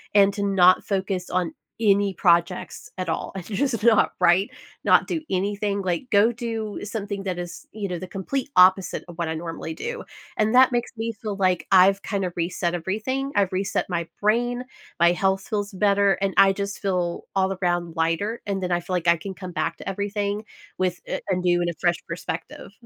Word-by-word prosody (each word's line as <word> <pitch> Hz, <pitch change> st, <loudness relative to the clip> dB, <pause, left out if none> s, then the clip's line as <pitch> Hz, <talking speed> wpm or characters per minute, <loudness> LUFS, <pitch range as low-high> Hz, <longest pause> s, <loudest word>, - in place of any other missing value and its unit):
and 200 Hz, 0 st, +6 dB
to 200 Hz, -, -3 dB
not 185 Hz, -2 st, +5 dB
focus 190 Hz, -2 st, -2 dB
on 180 Hz, -2 st, -1 dB, 0.3 s
any 200 Hz, -2 st, +3 dB
projects 170 Hz, +1 st, +1 dB
at 185 Hz, -2 st, -3 dB
all, -, -, -2 dB
and 180 Hz, -3 st, -6 dB
just 230 Hz, 0 st, -1 dB
not 230 Hz, -3 st, +4 dB
write, 185 Hz, +6 st, +4 dB, 0.3 s
not -, -, +5 dB
do 320 Hz, -, -2 dB
anything, 200 Hz, +2 st, -1 dB
like, 180 Hz, +6 st, -2 dB
go 210 Hz, +3 st, +5 dB
do 225 Hz, -3 st, -4 dB
something 205 Hz, -2 st, -4 dB
that 185 Hz, -2 st, -3 dB
is, 175 Hz, +12 st, -7 dB
you 205 Hz, -2 st, -4 dB
know, 175 Hz, -2 st, -4 dB
the 185 Hz, -, -7 dB
complete 260 Hz, +10 st, -3 dB
opposite 185 Hz, 0 st, +4 dB
of 170 Hz, -, -10 dB
what 170 Hz, -, 0 dB
I 160 Hz, -, -2 dB
normally 165 Hz, -1 st, -5 dB
do, 475 Hz, 0 st, -5 dB, 0.3 s
and 220 Hz, +3 st, +2 dB
that 260 Hz, 0 st, +7 dB
makes 240 Hz, 0 st, -1 dB
me 230 Hz, +1 st, -2 dB
feel 210 Hz, -3 st, -3 dB
like 185 Hz, -2 st, +1 dB
I've 195 Hz, +1 st, +6 dB
kind 195 Hz, -3 st, -2 dB
of 175 Hz, -, -4 dB
reset 175 Hz, 0 st, -1 dB
everything, 220 Hz, +11 st, -2 dB
I've 195 Hz, -2 st, +2 dB
reset 195 Hz, +1 st, -1 dB
my 170 Hz, -2 st, -2 dB
brain, 240 Hz, +4 st, +1 dB, 0.4 s
my 170 Hz, 0 st, +6 dB
health 190 Hz, +2 st, +1 dB
feels 205 Hz, -2 st, -2 dB
better, 200 Hz, 0 st, +3 dB
and 195 Hz, -1 st, 0 dB
I 195 Hz, 0 st, +7 dB
just 200 Hz, 0 st, -4 dB
feel 180 Hz, -3 st, -1 dB
all 190 Hz, 0 st, +2 dB
around 175 Hz, -1 st, 0 dB
lighter, 165 Hz, +8 st, -1 dB
and 195 Hz, -1 st, -1 dB
then 180 Hz, -, -2 dB
I 175 Hz, -, +2 dB
feel 180 Hz, +1 st, -4 dB
like 175 Hz, -1 st, -2 dB
I 170 Hz, 0 st, +5 dB
can 190 Hz, +3 st, -7 dB
come 185 Hz, -2 st, -7 dB
back -, -, -2 dB
to -, -, -10 dB
everything 205 Hz, +1 st, -2 dB, 0.3 s
with, 180 Hz, -1 st, 0 dB
a -, -, -3 dB
a 185 Hz, -, +2 dB
new, 175 Hz, -1 st, +2 dB
and 175 Hz, -, 0 dB
a -, -, -3 dB
fresh 175 Hz, -1 st, +2 dB
perspective. 165 Hz, +2 st, -6 dB
195 Hz, 200 wpm, -24 LUFS, 175-205 Hz, 0.4 s, that